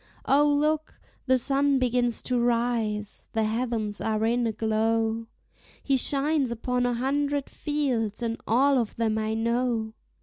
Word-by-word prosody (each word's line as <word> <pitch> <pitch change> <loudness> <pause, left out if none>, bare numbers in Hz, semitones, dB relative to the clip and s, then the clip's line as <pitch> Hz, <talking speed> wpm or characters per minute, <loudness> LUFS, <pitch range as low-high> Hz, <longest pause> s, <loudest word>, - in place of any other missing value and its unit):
O, 290 +2 +4
look! 305 +2 0 0.3
the 260 0 +4
sun 275 +2 +2
begins 245 -2 +1
to 250 -1 0
rise! 230 -3 -1
the 225 - +1
heavens 220 -2 -2
are 220 0 0
in 235 +1 +1
a - - 0
glow; 225 +1 0 0.6
He 275 - +2
shines 280 +1 +1
upon 245 +1 -1
a 245 - 0
hundred 280 +3 -1
fields, 250 -8 -2
and 230 0 -3
all 265 +4 +4
of 230 -3 -3
them 220 -1 0
I 220 0 -1
know. 230 -1 0
240 Hz, 145 wpm, -26 LUFS, 225-270 Hz, 0.6 s, O